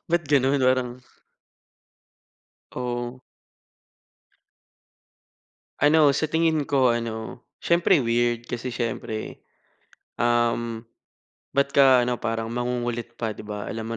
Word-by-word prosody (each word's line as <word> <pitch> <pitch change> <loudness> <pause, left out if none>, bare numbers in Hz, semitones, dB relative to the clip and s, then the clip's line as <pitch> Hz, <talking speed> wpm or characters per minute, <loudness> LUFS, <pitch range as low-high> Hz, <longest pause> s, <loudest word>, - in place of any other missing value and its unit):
Ba't 170 -1 +1
gano'n? 140 -1 +3
Parang 130 -1 +2 1.8
Oo. 120 0 -4 2.6
Ano, 145 -1 +5
sa - - -1
tingin 160 -2 +2
ko 130 -4 +2
ano, 115 +1 -5 0.2
siyempre 170 -2 +3
weird, 120 0 0
kasi 120 +1 -4
siyempre, 115 -2 -4 0.7
um, 120 -1 0 0.7
ba't 140 0 +2
ka, 130 -3 +6
ano, 125 -1 -2
parang 115 0 -3
mangungulit 120 -1 -3
pa, 110 -2 -2
'di - - -11
ba? 105 -1 -6
Alam 115 +1 -5
120 Hz, 100 wpm, -24 LUFS, 115-135 Hz, 2.6 s, ka